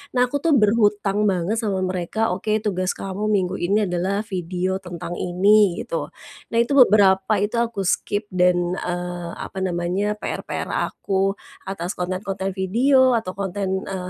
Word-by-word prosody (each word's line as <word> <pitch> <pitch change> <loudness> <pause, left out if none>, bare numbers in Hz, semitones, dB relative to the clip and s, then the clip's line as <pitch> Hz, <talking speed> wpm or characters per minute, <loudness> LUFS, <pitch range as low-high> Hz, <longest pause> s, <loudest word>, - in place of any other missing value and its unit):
Nah 250 - +3
aku 260 +3 -1
tuh 315 0 +3
berhutang 210 -2 +2
banget 190 +3 0
sama 200 -5 -1
mereka, 185 +4 -1
oke, 215 +3 -1
tugas 185 -3 -1
kamu 195 +2 -4
minggu 190 -3 0
ini 200 +5 +1
adalah 190 +2 -1
video 185 -2 -3
tentang 175 -2 -7
ini 190 +1 +3
gitu. - - -3 0.5
Nah - - +3
itu, 235 - -7
beberapa 200 -4 +5
itu 215 +3 -1
aku 230 -4 -1
skip 205 +3 0
dan, 180 0 +2
eee, 175 -1 -4
apa 190 - -7
namanya, 185 +3 -1
PR-PR - - -4
aku 195 0 -1 0.3
atas 190 -1 -4
konten-konten 190 +1 -3
video 250 +7 +3
atau 185 -5 -4
konten, 190 0 -2
eee 185 -2 -4
195 Hz, 150 wpm, -22 LUFS, 180-210 Hz, 0.5 s, beberapa